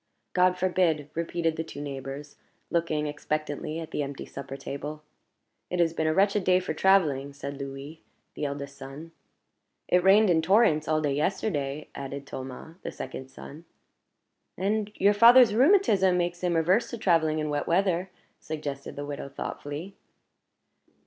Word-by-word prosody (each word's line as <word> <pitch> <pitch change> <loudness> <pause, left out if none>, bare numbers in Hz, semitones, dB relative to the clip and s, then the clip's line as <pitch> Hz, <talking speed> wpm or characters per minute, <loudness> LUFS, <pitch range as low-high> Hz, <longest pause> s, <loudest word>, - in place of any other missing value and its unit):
"God 180 0 +3
forbid!" 175 -5 +1
repeated 165 -1 -1
the 160 - -1
two 160 - -9
neighbors, 140 0 -6 0.4
looking 165 -3 0
expectantly 150 +1 -3
at 160 -1 -7
the - - -2
empty 140 -1 -5
supper 135 0 -8
table. 145 +2 -6 0.7
"It 180 - -2
has 165 -1 +3
been 160 -1 -1
a 155 - +2
wretched 200 +1 +3
day 180 0 +4
for 185 - -3
traveling;" 150 -7 +2
said 140 0 -7
Louis, 140 +3 -7 0.3
the 150 - -3
eldest 140 0 -5
son. 140 +4 -9 0.8
"It 180 0 +3
rained 195 +1 +6
in 160 -1 +3
torrents 160 -4 +3
all 155 0 +1
yesterday," 150 -1 -1
added 140 0 -6
Thomas; 135 +5 -8
the - - -5
second 130 0 -7
son. 150 +4 -11 0.9
"And 210 +3 -1
your 200 +2 +4
father's 235 +1 +7
rheumatism 220 - +4
makes 175 0 -1
him 175 -2 0
averse 180 +8 +2
to 235 - -5
traveling 165 -6 +2
in 155 -1 -2
wet 145 0 -2
weather," 185 +1 +1 0.3
suggested 145 -3 -6
the 145 - -5
widow, 145 -1 -6
thoughtfully. 145 +6 -6
160 Hz, 150 wpm, -27 LUFS, 145-185 Hz, 0.9 s, father's